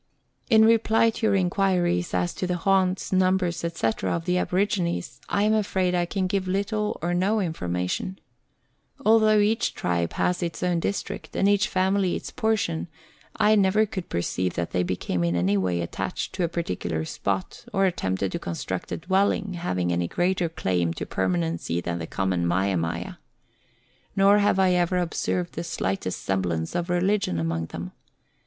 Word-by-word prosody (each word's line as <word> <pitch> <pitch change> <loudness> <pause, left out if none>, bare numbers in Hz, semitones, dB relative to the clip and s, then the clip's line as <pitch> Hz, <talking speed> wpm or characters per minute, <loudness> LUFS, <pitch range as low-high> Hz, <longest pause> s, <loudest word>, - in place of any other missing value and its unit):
In 220 -2 +6
reply 225 0 +4
to 220 0 -1
your 200 - +3
inquiries 180 -2 +1
as 175 - 0
to 185 - -3
the 180 0 -1
haunts, 190 +1 +1
numbers, 185 -2 +2
&c., 165 -8 -1
of 165 0 -1
the 180 0 +1
aborigines, 180 -2 -1
I 200 - +1
am 215 +1 +3
afraid 190 -4 +1
I 175 -1 +1
can 190 +1 -1
give 185 0 -1
little 210 +3 -1
or 175 +1 0
no 195 +5 +2
information. 90 - -2 0.9
Al 225 +1 +6
though 215 -1 +4
each 215 +3 +2
tribe 85 -1 -1
has 180 +1 0
its 170 0 -3
own 175 -1 +1
district, 200 +4 -4
and 195 - +2
each 205 +1 +3
family 190 -2 +1
its - - -6
portion, 210 -7 0 0.5
I 210 0 +4
never 210 +1 +4
could 190 -4 -6
perceive 90 +1 -1
that 85 0 -2
they 90 - +1
became 90 0 -1
in 85 0 +1
any 90 +4 +2
way 90 -3 0
attached 85 - -4
to 185 - -1
a - - +2
particular 90 - -3
spot, 95 +3 -3
or 195 -1 +2
attempted 95 - -1
to - - -3
construct 85 +2 -4
a - - -1
dwelling 195 +3 +1
having 90 - -1
any 85 0 0
greater 175 - 0
claim 90 - -1
to - - -4
permanency 85 -2 -1
than 85 0 -3
the 80 - -5
common 90 -3 0
mia 95 +3 +1
mia. 85 -1 -3 1.0
Xor 200 +1 +6
have 205 -2 +3
I 190 -1 +4
ever 180 0 +2
observed 175 0 -1
the 170 - -4
slightest 95 - -3
semblance 90 -4 -1
of 175 0 -2
religion 180 - +1
among 80 0 -2
them. - - -7
175 Hz, 170 wpm, -25 LUFS, -, 1.0 s, In